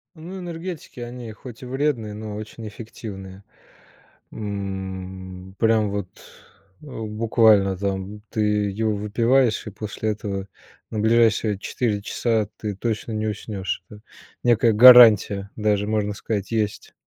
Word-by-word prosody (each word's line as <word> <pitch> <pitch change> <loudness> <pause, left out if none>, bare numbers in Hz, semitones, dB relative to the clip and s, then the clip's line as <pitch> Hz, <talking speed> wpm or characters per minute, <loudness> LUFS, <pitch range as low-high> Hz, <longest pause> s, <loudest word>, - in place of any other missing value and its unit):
Ну, 175 +4 -8
энергетики- 170 -4 -7
они 120 -1 -7
хоть 120 +1 -12
и - - -7
вредные, 125 -5 -1
но 105 0 -6
очень 110 +1 -8
эффективные, 100 -3 -9 0.9
м, 95 -2 -6
прям 110 -2 +3
вот, 100 -2 -3 0.7
э, - - -14
буквально 110 -4 +2
там, 100 +1 -3
ты 110 - -2 0.3
его 110 +1 -1
выпиваешь, 115 +4 +1
и - - -3
после 110 +1 -3
этого 100 -2 -4 0.4
на 110 - -2
ближайшие 110 -2 +3
4 105 -1 -2
часа 110 0 0
ты 105 -1 -4
точно 110 +2 -3
не 110 0 -2
уснешь, 100 -4 -4
это 105 0 -12 0.4
некая 120 -1 +4
гарантия, 110 -4 +8
даже 105 -1 +1
можно 105 -1 0
сказать, 105 -1 -4
есть. 110 -2 -2
110 Hz, 125 wpm, -23 LUFS, 100-115 Hz, 0.9 s, гарантия